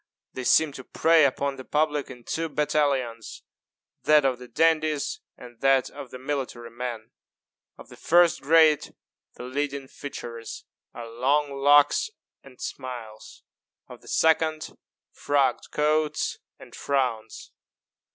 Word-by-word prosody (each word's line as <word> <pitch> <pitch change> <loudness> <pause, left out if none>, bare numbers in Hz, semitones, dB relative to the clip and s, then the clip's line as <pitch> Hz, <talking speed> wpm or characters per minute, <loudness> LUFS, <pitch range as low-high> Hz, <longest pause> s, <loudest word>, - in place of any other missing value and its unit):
They 130 - -6
seem 160 +3 +4
to 130 - -10
prey 160 +3 +3
upon 140 0 -1
the 130 - -8
public 150 0 0
in 125 -2 -11
two 165 +6 -3
battalions 140 -7 -1 0.6
that 150 -2 +4
of 130 -2 0
the 125 - -11
dandies 155 - +1 0.2
and 120 -2 -14
that 135 -1 +3
of 130 - -9
the 130 - -9
military 130 -3 -5
men. 120 -2 -6 0.7
Of - - -14
the - - -12
first 175 0 +3
grade 155 0 +4 0.4
the - - -9
leading 140 +1 -3
features 120 -5 -8 0.3
are 120 -1 -8
long 140 +5 0
locks 145 - +4 0.3
and - - -17
smiles; 125 - -8 0.4
of - - -13
the - - -19
second 160 -1 +1 0.4
frogged 145 -2 0
coats 150 0 0 0.2
and - - -15
frowns. 125 -6 -2
140 Hz, 130 wpm, -25 LUFS, 125-150 Hz, 0.7 s, seem